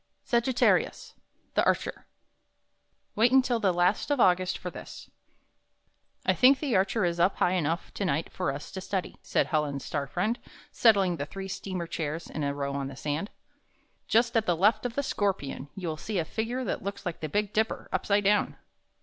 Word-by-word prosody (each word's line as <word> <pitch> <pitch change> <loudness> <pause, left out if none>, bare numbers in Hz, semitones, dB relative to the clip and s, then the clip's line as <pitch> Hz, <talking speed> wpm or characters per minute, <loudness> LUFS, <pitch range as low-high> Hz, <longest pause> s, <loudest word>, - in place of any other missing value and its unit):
SAGITTAHIUS, 240 +1 +1 0.4
THE - - +3
ARCHER - - -1 1.1
Wait 230 +3 +4
until 255 -3 +4
the 200 -4 +3
last 180 +7 +1
of 290 -2 +1
August 185 -2 +3
for 180 - -6
this - - -10 1.1
"1 - - +3
think 265 +2 +6
the 275 -7 0
Archer 195 +2 +2
is 170 0 -1
up 180 +3 +3
high 180 - +2
enough 170 -2 -1
to - - -3
night 165 -3 -1
for 180 -6 -1
us 140 +2 -7
to 190 -1 -6
study," 190 -1 -3
said - - +1
Helen's 150 -4 -1
star 145 -2 -2
friend, 210 - -1 0.3
settling 195 -6 +4
the 145 - -4
three 195 +3 -6
steamer 185 -1 -4
chairs 160 0 -4
in 150 - -3
a 140 - 0
row 140 -1 -3
on 140 -1 -2
the 135 - -8
sand. 150 +8 -3 0.8
"Just 230 +1 +3
at 225 -1 +2
the 175 - +3
left 215 +6 +3
of 235 - -10
the 280 - 0
Scorpion, 190 - -2
you 190 -3 -5
will 155 - -3
see 210 +6 -4
a 165 - 0
figin^e 235 +8 -3
that - - -2
looks 200 +1 -5
like 175 -2 -3
the 155 - -4
Big 210 +4 -1
Dipper 220 +1 0
up - - -1
side 205 0 +3
down." 205 +1 +2
190 Hz, 190 wpm, -28 LUFS, 160-220 Hz, 1.1 s, think